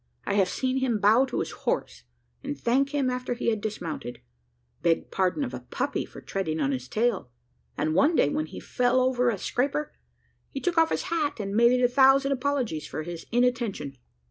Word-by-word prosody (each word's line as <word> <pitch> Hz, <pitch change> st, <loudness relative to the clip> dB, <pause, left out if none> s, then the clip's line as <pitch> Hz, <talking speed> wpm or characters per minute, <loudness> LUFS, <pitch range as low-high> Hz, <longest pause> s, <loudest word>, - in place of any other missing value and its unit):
I -, -, -1 dB
have 195 Hz, -2 st, +3 dB
seen 260 Hz, +4 st, -1 dB
him 260 Hz, -4 st, +1 dB
bow 220 Hz, +6 st, +5 dB
to -, -, -2 dB
his -, -, -4 dB
horse, -, -, -3 dB, 0.4 s
and 145 Hz, -, -4 dB
thank 265 Hz, -, +2 dB
him 280 Hz, -2 st, 0 dB
after 250 Hz, -1 st, -3 dB
he 235 Hz, -, 0 dB
had 215 Hz, -2 st, -2 dB
dismounted 170 Hz, -, -5 dB, 0.6 s
beg 170 Hz, -1 st, +1 dB
pardon 190 Hz, +9 st, +1 dB
of 255 Hz, -, -4 dB
a -, -, -4 dB
puppy -, -, -3 dB
for -, -, -12 dB
treading 160 Hz, -5 st, -3 dB
on 140 Hz, -2 st, +1 dB
his 130 Hz, -1 st, -4 dB
tail; 215 Hz, -, 0 dB, 0.5 s
and 155 Hz, +2 st, 0 dB
one 300 Hz, -, +4 dB
day, 145 Hz, -, +4 dB
when 155 Hz, +1 st, -2 dB
he -, -, -9 dB
fell 250 Hz, +1 st, +1 dB
over 250 Hz, -1 st, +2 dB
a 220 Hz, -, -1 dB
scraper, 280 Hz, +9 st, -1 dB, 0.6 s
he 275 Hz, -, -5 dB
took 355 Hz, +3 st, -1 dB
off 325 Hz, 0 st, +4 dB
his -, -, -1 dB
hat, 300 Hz, -6 st, -1 dB
and 200 Hz, -1 st, -3 dB
made 235 Hz, +2 st, +5 dB
it -, -, +1 dB
a -, -, +6 dB
thousand 270 Hz, +2 st, +5 dB
apologies 255 Hz, -, -1 dB
for 155 Hz, -, -5 dB
his 170 Hz, 0 st, -7 dB
inattention." 235 Hz, -, 0 dB
240 Hz, 200 wpm, -27 LUFS, 180-265 Hz, 0.6 s, a